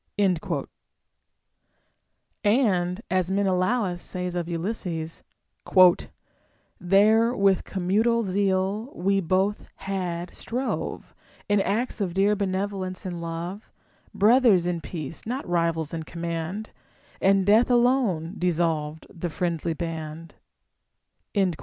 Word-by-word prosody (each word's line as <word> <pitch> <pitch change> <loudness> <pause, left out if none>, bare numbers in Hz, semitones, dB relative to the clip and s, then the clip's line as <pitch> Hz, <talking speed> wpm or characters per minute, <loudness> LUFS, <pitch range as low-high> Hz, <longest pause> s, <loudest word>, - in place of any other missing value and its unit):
* - - -51 2.3
And, 205 -5 +2
as 185 -1 +1
Menelaus 190 0 +1
says 180 -1 -4
of 175 -1 -3
Ulysses: 170 -2 -3 0.7
— - - -18
There 215 +6 +4
with 195 -3 +3
commutual 215 +5 +1
zeal 195 +4 0
we 195 +2 +1
both 190 +3 0
had 180 -3 -4
strove 255 +3 -4 0.3
In 205 -1 +3
acts 225 +3 -1
of 180 -3 -2
dear 200 +2 +3
benevolence 190 -1 -3
and 175 -2 -4
love, 170 +5 -5 0.2
— - - -34
Brothers 215 -4 +5
in 175 -1 -1
peace, 160 +2 -7
not 255 0 -3
rivals 165 -3 0
in 165 - -3
command, 170 +5 -5 0.2
— - - -30
And 195 0 +4
death 215 +5 +5
alone 240 -9 +2
dissolved 160 -3 0
the 175 +1 -5
friendly 165 0 -2
band. 160 -1 -6
185 Hz, 110 wpm, -25 LUFS, 170-205 Hz, 2.3 s, Brothers